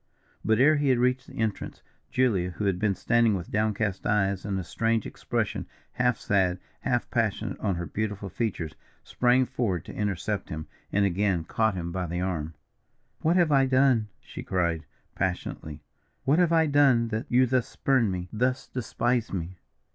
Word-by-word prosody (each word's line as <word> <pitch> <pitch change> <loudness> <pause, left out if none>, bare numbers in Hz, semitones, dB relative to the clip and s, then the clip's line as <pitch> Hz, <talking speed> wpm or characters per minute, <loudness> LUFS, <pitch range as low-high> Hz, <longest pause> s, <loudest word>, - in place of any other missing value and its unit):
But 110 0 +2
ere 150 +4 +6
he 145 -1 +1
had 130 - +4
reached 125 +1 +1
the - - -12
entrance, 110 -2 -3 0.3
Julia, 105 -9 +2
who 100 +3 -4
had 95 -2 +1
been 100 -1 +1
standing 115 -1 +3
with 85 -2 -6
down 110 0 +1
cast 100 -3 -2
eyes 100 -2 +1
and 100 -2 -1
a - - -3
strange 115 +5 0
expression, - - -3 0.2
half 125 -2 +1
sad, 95 -3 +1 0.2
half - - 0
passionate - - -1
on 95 - 0
her 85 0 -3
beautiful 105 +3 -3
features, 90 -6 -3 0.3
sprang 125 +1 +3
forward 100 -10 -2
to - - -8
intercept 105 0 -2
him, 80 0 -5 0.3
and 100 0 +3
again 95 -2 +1
caught 110 +4 0
him 85 -1 -4
by 90 0 -2
the 85 +2 -3
arm. 80 -4 -2 0.6
"What 165 +3 +2
have 175 -4 +4
I 135 -2 +4
done," 130 -4 +3
she - - -9
cried, 85 -4 -1 0.3
passionately, 80 -4 -3 0.4
"what 145 +5 +3
have 175 -2 +4
I 165 -1 +4
done 140 -6 +4
that 110 +1 -3
you 125 +1 +5
thus 125 -1 +1
spurn 130 -6 +1
me 90 -1 -3
thus 125 +4 0
despise 120 -1 -1
me?" 90 -1 -5
105 Hz, 175 wpm, -27 LUFS, 90-125 Hz, 0.6 s, ere